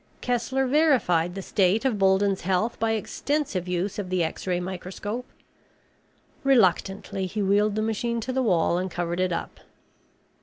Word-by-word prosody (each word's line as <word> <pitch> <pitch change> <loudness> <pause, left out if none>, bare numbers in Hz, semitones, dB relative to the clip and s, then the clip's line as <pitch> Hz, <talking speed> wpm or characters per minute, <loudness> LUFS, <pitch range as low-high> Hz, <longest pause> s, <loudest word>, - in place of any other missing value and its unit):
Kessler 245 +2 0
verified 250 - +2
the 195 - -5
state 200 +6 +2
of 235 -6 +1
Bolden's 195 0 +3
health 190 +6 0
by 225 0 +1
extensive 220 - -2
use 180 +3 -2
of 190 -3 -4
the 185 -2 +1
X 160 - -4
ray 180 -1 +1
microscope. 190 +6 -5 1.2
Reluctantly 195 -6 +2
he 205 +3 -2
wheeled 205 +2 +2
the 215 - 0
machine 230 +2 -1
to 255 +3 -3
the 260 - +1
wall 175 -6 +2
and 185 +1 -2
covered 175 0 -3
it 185 -1 +1
up. 170 - -4
195 Hz, 155 wpm, -25 LUFS, 180-230 Hz, 1.2 s, Bolden's